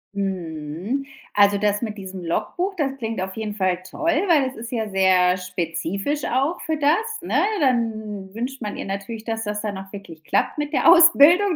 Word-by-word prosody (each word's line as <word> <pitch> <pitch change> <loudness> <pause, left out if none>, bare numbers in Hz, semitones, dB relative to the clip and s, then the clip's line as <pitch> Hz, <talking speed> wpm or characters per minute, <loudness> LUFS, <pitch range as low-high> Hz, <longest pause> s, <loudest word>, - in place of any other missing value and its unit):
Mhm. 185 - -3 0.3
Also 205 0 +5
das 205 +1 +1
mit 215 -2 -4
diesem 190 -2 -7
Logbuch, 360 - -2
das 275 -4 -1
klingt 225 -3 -3
auf 190 0 -4
jeden 215 -2 -4
Fall 185 -3 +1
toll, 330 - 0 0.2
weil 295 -7 +4
es 260 - -7
ist 230 +1 -8
ja 225 -3 -2
sehr 185 -2 +3
spezifisch 180 - -3
auch 275 +8 0
für 315 0 -2
das, 290 0 +3 0.3
ne? - - -5 0.3
Dann 220 -7 -1
wünscht 255 +3 -4
man 210 -1 -4
ihr - - -5
natürlich, 200 +3 -5
dass 225 -1 -3
das 210 0 -3
dann 210 -2 -3
auch 195 0 -11
wirklich 170 -6 -10
klappt 300 - 0
mit 295 0 -2
der 325 - +2
Ausbildung. 345 +2 +7
210 Hz, 185 wpm, -22 LUFS, 190-270 Hz, 0.3 s, Ausbildung